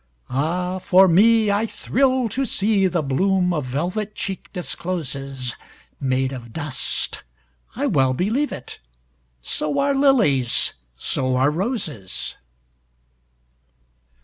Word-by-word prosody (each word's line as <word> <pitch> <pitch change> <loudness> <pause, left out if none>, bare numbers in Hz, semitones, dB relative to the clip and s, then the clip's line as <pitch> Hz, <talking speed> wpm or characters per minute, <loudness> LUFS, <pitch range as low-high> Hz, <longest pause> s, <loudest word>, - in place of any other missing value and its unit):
Ah, 180 +7 -1
for 185 +1 +5
me, 215 +4 +5
I 205 +3 +1
thrill 260 +1 +1
to 260 - -2
seeThe 195 - +1
bloom 180 +5 +2
a 155 - 0
velvet 180 - -3
cheek 195 -2 -5
discloses, 140 -8 -3 0.4
Made 130 0 0
of 120 -3 -8
dust—I 60 - -5
well 130 -2 +2
believe 225 - 0
it! - - -8 0.6
So 150 - 0
are 280 0 +2
lilies, 225 - +3 0.2
so 130 - 0
are 135 +3 +3
roses! 160 - -3
175 Hz, 100 wpm, -22 LUFS, 130-205 Hz, 0.6 s, for